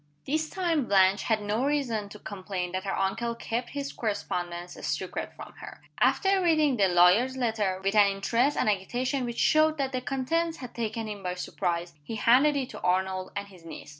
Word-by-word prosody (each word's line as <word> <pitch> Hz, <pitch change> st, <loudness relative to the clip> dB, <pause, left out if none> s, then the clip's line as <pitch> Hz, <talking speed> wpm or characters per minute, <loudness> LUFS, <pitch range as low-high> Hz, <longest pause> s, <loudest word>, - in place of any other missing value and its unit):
This 310 Hz, +2 st, -1 dB
time 335 Hz, -7 st, 0 dB
Blanche 195 Hz, -1 st, +4 dB
had 220 Hz, -2 st, 0 dB
no 210 Hz, +4 st, -1 dB
reason 255 Hz, -8 st, -1 dB
to 210 Hz, -, -10 dB
complain 190 Hz, -3 st, -5 dB
that 185 Hz, +1 st, -3 dB
her 195 Hz, -, -2 dB
uncle 230 Hz, +5 st, -1 dB
kept 240 Hz, +1 st, -3 dB
his 280 Hz, -1 st, -5 dB
correspondence 175 Hz, -5 st, -3 dB
a -, -, -11 dB
secret 150 Hz, +5 st, -3 dB
from -, -, -10 dB
her. -, -, -10 dB, 0.2 s
After 390 Hz, -1 st, +3 dB
reading 310 Hz, -6 st, +3 dB
the 200 Hz, -4 st, +3 dB
lawyer's 185 Hz, +9 st, +4 dB
letter, 220 Hz, -6 st, 0 dB
with 195 Hz, +1 st, +1 dB
an 210 Hz, -2 st, +6 dB
interest 230 Hz, +8 st, +1 dB
and -, -, +1 dB
agitation 245 Hz, +7 st, 0 dB
which 235 Hz, -1 st, -5 dB
showed 310 Hz, 0 st, +3 dB
that 270 Hz, -2 st, -1 dB
the 255 Hz, -1 st, -2 dB
contents 320 Hz, +6 st, -1 dB
had 250 Hz, -3 st, -9 dB
taken 225 Hz, -1 st, -3 dB
him 205 Hz, -2 st, -6 dB
by 180 Hz, -1 st, -3 dB
surprise, 175 Hz, -1 st, -3 dB
he 225 Hz, -, -6 dB
handed 255 Hz, +7 st, +4 dB
it 265 Hz, -3 st, -2 dB
to -, -, -9 dB
Arnold 185 Hz, +1 st, 0 dB
and 200 Hz, 0 st, -4 dB
his 185 Hz, -4 st, -16 dB
niece. 165 Hz, -, -9 dB
220 Hz, 195 wpm, -28 LUFS, 190-265 Hz, 0.2 s, an